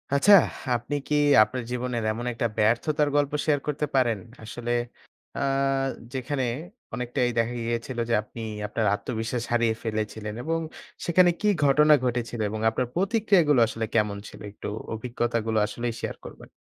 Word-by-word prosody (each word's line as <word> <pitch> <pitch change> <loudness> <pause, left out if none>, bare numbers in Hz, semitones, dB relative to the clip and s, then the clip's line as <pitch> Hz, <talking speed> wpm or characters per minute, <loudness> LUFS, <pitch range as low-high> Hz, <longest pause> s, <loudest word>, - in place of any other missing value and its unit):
আচ্ছা, 195 +9 +6 0.4
আপনি 145 +5 -3
কি 150 - +1 0.3
আপনার 125 +2 -4
জীবনের 125 -2 -2
এমন 120 +3 -4
একটা 115 0 0
ব্যর্থতার 145 +7 +2
গল্প 145 -1 +2
শেয়ার 150 -2 +2
করতে 150 0 -1
পারেন? 120 -5 +2 0.2
আসলে 120 +2 -5 0.7
আ - - -1 0.7
যেখানে 130 +1 -2 0.5
অনেকটাই 125 +1 -1
দেখা 115 +1 +1
গিয়েছিল 115 +2 -3
যে - - +2
আপনি 115 +2 -10 0.3
আপনার 110 +1 -1
আত্মবিশ্বাস 115 +2 -3
হারিয়ে 115 -2 +2
ফেলেছিলেন? 110 -1 -3
এবং 165 +1 0 0.5
সেখানে 175 +1 +5
কী 210 - +1 0.2
ঘটনা 150 +2 +6
ঘটেছিল? 120 -2 -2
এবং 110 +1 -4
আপনার 120 +3 -2
প্রতিক্রিয়াগুলো 190 - +3
আসলে 115 0 -3
কেমন 105 -2 +2
ছিল? - - -12
একটু 105 - -8 0.3
অভিজ্ঞতাগুলো 115 -1 -1
আসলেই 120 +2 -3
শেয়ার - - -4
করবেন। - - -11
120 Hz, 145 wpm, -26 LUFS, 115-145 Hz, 0.7 s, আচ্ছা